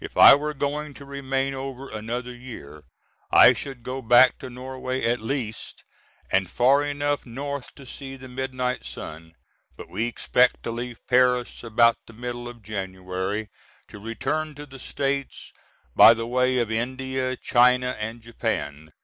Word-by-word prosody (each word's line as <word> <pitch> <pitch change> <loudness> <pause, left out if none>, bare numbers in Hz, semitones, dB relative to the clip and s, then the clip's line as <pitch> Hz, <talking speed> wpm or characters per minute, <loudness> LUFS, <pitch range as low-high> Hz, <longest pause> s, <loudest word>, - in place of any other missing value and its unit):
If - - -8
I - - +11
were 150 +2 0
going 145 +1 -3
to 140 - -11
remain 135 -1 -2
over 135 0 -6
another 120 +3 -5
year 115 - -11 0.4
I 125 - +8
should 130 -1 -7
go 130 +2 -4
back 120 +2 +6
to 130 - -7
Norway 130 +1 -5
at 120 +1 +1
least 115 -2 -4 0.5
and 95 -2 +2
far 135 +7 +4
enough 145 0 -1
north 140 +2 -6
to 140 - -13
see 135 +1 -8
the 130 0 -11
midnight 130 0 -3
sun. 80 +1 -9 0.4
But - - -10
we 115 - -1
expect 125 +1 +2
to 115 - -3
leave 120 0 -6
Paris 125 -1 +2
about 115 0 +4
the 115 - -13
middle 120 +1 -6
of 120 -2 -11
January, 95 +1 -4 0.4
to 105 - -11
return 135 +8 -3
to 145 +1 -9
the 135 -2 -12
States 140 +1 -3 0.4
by 115 - +9
the 115 0 -4
way 125 +1 +1
of 115 -3 0
India, 130 +2 -2
China, 125 +1 +3
and 110 +2 -5
Japan. 80 -9 -4
125 Hz, 160 wpm, -25 LUFS, 115-135 Hz, 0.5 s, I